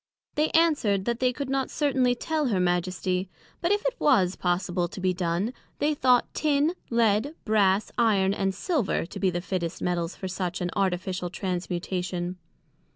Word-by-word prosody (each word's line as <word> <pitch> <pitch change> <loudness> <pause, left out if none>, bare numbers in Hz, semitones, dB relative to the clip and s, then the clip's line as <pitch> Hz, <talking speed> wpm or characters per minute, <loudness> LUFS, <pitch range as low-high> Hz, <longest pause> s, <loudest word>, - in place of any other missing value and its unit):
They 305 +1 +1
answered, 270 - +3
That 235 0 -1
they 255 -1 +3
could 275 +2 -4
not 270 0 -1
certainly 260 -4 +2
tell 310 +2 -1
her 205 -6 +1
Majesty, 180 +1 0 0.3
but 345 +1 +1
if 415 0 +1
it - - -1
was 190 -10 +3
possible 175 0 0
to 180 - -9
be 185 0 +1
done, 180 +5 -1 0.2
they 300 +1 +1
thought 255 -4 +3
Tin, 300 +2 +2 0.2
Lead, 230 +5 +2
Brass, 205 -2 +2
Iron 200 -4 +3
and 195 -1 -1
Silver, 265 - 0
to 170 - -8
be 190 - +2
the 175 -1 -2
fittest 175 -2 -3
Metals 175 -1 -1
for 190 - -5
such 180 -1 -3
an 180 0 -2
Artificial 185 -2 -1
Transmutation. 180 0 -3
195 Hz, 165 wpm, -26 LUFS, 180-255 Hz, 0.3 s, answered